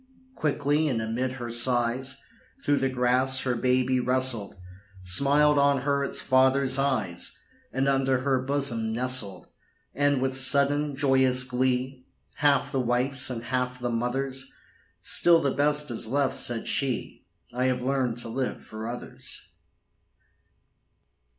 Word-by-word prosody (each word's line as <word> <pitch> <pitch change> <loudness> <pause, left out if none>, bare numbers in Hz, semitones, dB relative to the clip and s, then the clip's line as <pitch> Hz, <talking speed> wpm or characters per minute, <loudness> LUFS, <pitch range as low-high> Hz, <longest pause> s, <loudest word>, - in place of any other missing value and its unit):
Quickly, 150 - 0
and 125 -6 -1
amid 115 +4 -2
her 120 -2 -6
sighs, 120 +2 +1 0.5
Through 145 0 +2
the 135 - 0
grass 130 +1 +2
her 125 - -1
baby 125 +1 +1
wrestled, 125 -4 0 0.5
Smiled 140 +10 +3
on 140 -1 +3
her 140 0 0
its 140 - -2
father's 130 +1 +3
eyes, 110 -11 -2 0.3
And 135 +1 -1
unto 135 -1 +1
her 130 0 0
bosom 130 -5 -1
nestled. 125 -4 -1 0.4
And 145 -1 +1
with 130 0 -1
sudden, 140 +2 +2
joyous 130 -2 +2
glee, 130 +1 -2 0.3
Half 140 -2 +2
the 135 - -1
wife's 125 +2 +1
and 120 -2 -5
half 125 +1 -2
the 120 -1 -3
mother's, 130 +3 -3 0.5
"Still 170 -1 +5
the 140 -3 0
best 145 0 +1
is 110 -1 -3
left," 135 +3 0
said 120 -2 -1
she: 130 -4 -3 0.3
"I 125 +1 -1
have 125 -1 0
learned 130 -3 -1
to 120 - -2
live 130 +3 -4
for 110 +1 -8
others." 120 +1 -7
130 Hz, 135 wpm, -26 LUFS, 125-140 Hz, 0.5 s, Still